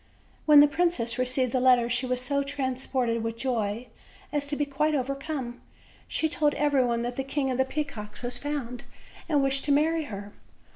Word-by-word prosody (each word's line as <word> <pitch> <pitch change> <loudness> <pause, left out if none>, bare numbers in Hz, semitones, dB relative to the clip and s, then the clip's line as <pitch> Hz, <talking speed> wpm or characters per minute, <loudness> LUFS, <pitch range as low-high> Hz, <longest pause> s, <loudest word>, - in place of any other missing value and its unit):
When 300 -1 +9
the 295 - +7
princess 290 -8 0
received 255 0 +1
the 255 - +1
letter 250 -2 +5
she 245 +2 0
was 250 0 -1
so 280 +2 0
trans 265 -2 -3
ported 240 -3 0
with 230 0 -3
joy 230 -3 -1 0.5
as 290 -1 0
to 290 - 0
be 290 - 0
quite 300 +2 0
overcome; 275 -2 -3 0.5
she 320 - 0
told 300 -1 +1
every 290 -2 +2
body 235 -1 0
that 245 +1 -4
the 270 - -1
King 270 0 -1
of 255 - -2
the 265 - +4
Peacocks 255 -7 -5
was 245 0 -3
found 275 -5 -4 0.5
and 290 -3 +3
wished 270 0 +1
to 290 - +1
marry 315 +2 +2
her. 205 -4 -8
265 Hz, 195 wpm, -27 LUFS, 245-290 Hz, 0.5 s, When